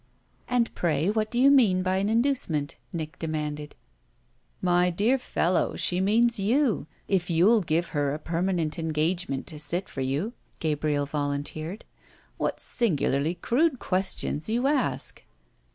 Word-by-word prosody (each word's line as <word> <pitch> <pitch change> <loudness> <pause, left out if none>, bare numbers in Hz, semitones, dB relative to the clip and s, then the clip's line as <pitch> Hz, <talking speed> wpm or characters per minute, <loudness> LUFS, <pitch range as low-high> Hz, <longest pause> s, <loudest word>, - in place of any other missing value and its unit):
"And 245 -2 +1
pray 165 +2 +1
what 215 0 0
do 240 - -1
you 275 +2 +6
mean 205 -10 +4
by 185 0 +1
an 200 +2 0
inducement?" 225 - 0 0.2
Nick 160 0 -5
demanded. 150 -2 -4 0.8
"My 180 0 +3
dear 215 +10 +2
fellow, 180 -7 0
she 180 +1 +1
means 230 +3 +3
you 225 - +1 0.2
if 185 -3 0
you'll 190 +7 +4
give 170 0 0
her 145 -2 0
a 145 - -2
permanent 170 0 -1
engagement 160 -2 -1
to 155 -3 -7
sit 170 +6 -1
for 135 - -6
you!" 145 - -1 0.2
Gabriel 150 -2 0
volunteered. 145 +6 -3 0.5
"What - - -2
singularly 155 - 0
crude 265 - +1
questions 185 -4 -1
you 240 +3 0
ask!" 275 -3 -1
175 Hz, 135 wpm, -26 LUFS, 155-220 Hz, 0.8 s, you